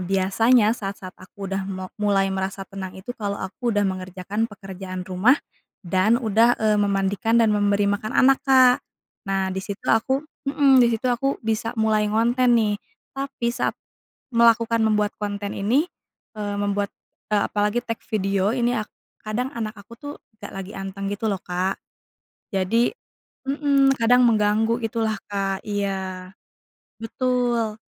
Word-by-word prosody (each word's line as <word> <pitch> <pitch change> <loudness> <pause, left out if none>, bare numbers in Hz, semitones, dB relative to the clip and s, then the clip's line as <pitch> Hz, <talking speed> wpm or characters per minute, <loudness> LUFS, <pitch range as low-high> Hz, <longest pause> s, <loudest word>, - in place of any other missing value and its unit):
biasanya 200 +5 +3
saat-saat 195 -4 -5
aku 195 +1 -9
udah 195 0 -2
mo 185 -1 -6
mulai 200 -2 +2
merasa 190 0 -3
tenang 190 -1 -7
itu 190 +5 -9
kalau 200 -2 -2
aku 225 +5 -3
udah 205 - +2
mengerjakan 185 +3 -2
pekerjaan 190 -3 -7
rumah 185 +7 +3 0.5
dan 185 +4 +2
udah, 230 0 +3
eee, 215 -1 +3
memandikan 200 +2 +1
dan 225 - +3
memberi 205 -1 +2
makan 215 +3 -3
anak, 270 +1 +5
Kak. 255 -2 +6 0.5
Nah, 195 -1 0
di 190 - -3
situ 195 +1 -6
aku 265 +5 +2 0.2
mmm, 275 -1 +4
di 245 - +6
situ 225 - -6
aku 270 +3 -1
bisa 225 +1 -1
mulai 220 -2 +2
ngonten 240 +3 +3
nih. 210 -3 +2 0.3
Tapi 270 -3 -3
saat 245 +1 -1 0.6
melakukan 230 0 +4
membuat 210 -1 +1
konten 205 -1 -4
ini, 240 - +2 0.5
eee, 205 -1 -3
membuat, 205 0 -1 0.4
eee, 210 - +4
apalagi 210 +3 0
take 230 -2 -5
video 195 0 +1
ini 245 -1 +1
ak 215 -2 -2 0.4
kadang 230 +4 -2
anak 220 -2 -3
aku 200 +3 -15
tuh 290 0 -7 0.3
gak 205 - -8
lagi 195 +1 -6
anteng 195 0 -5
gitu 205 +2 -4
loh, 190 - -3
Kak. 180 +2 -2 0.7
Jadi 210 - +2 0.6
mmm, 275 -1 +3
kadang 245 +2 +5
mengganggu 220 +1 +2
gitu 225 +1 -2
lah, 220 -1 0
Kak. 195 -1 -2
Iya. 190 -3 -3 0.7
Betul. 240 -2 0
210 Hz, 150 wpm, -23 LUFS, 195-235 Hz, 0.7 s, Kak